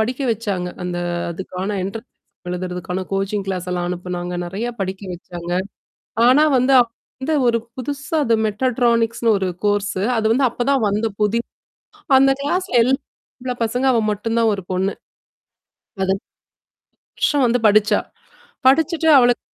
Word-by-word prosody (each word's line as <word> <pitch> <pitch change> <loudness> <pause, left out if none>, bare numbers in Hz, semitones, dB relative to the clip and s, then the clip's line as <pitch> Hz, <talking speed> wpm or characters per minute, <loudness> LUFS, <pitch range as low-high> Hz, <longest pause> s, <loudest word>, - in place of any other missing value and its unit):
படிக்க 250 +5 -1
வச்சாங்க. 200 -5 -3 0.2
அந்த 180 -1 -3 0.3
அதுக்கான 185 +3 -4
என்ட்ரன்ஸ் 220 +5 -6
எக்ஸாம். 180 - -13
எழுதுறதுக்கான 180 0 -4
கோச்சிங் 195 +1 -1
கிளாஸ் 185 -2 -3
எல்லாம் 175 0 -2
அனுப்புனாங்க. 180 0 -4
நிறையா 205 +7 -3
படிக்க 190 0 -4
வச்சாங்க. 175 0 -7 0.8
ஆனா 280 +5 +6
வந்து 255 +2 +3
அவ - - +2 0.4
வந்து 300 +4 -1
ஒரு 235 -1 +3 0.2
புதுசா 285 +4 -4
அது 230 - +3
மெட்டட்ரானிக்ஸ்னு 230 0 +1
ஒரு 190 -1 -1 0.2
கோர்ஸ்ஸு. 205 -2 0
அது 220 - -1
வந்து 265 +3 +3
அப்பதான் 260 +3 0
வந்த 210 +3 0
புதி 210 +2 +2 0.8
அந்த 270 +1 +5
கிளாஸ்ல 360 +1 0
எல்லாம் 265 +4 +1 0.4
ஆம்பள 250 0 -3
பசங்க, 245 +4 -1
அவ 235 - +3
மட்டும் 225 +3 -2
தான் 230 -1 +3
ஒரு 200 - -4
பொண்ணு. 190 +2 0 1.1
அதுப் 190 0 0 1.0
வருஷம் 285 -2 +2
வந்து 240 +1 +2
படிச்சா. 210 0 +4 0.7
படிச்சுட்டு 320 +4 +3
அவளுக்கு. 245 -2 +4
220 Hz, 140 wpm, -20 LUFS, 190-250 Hz, 1.1 s, ஆனா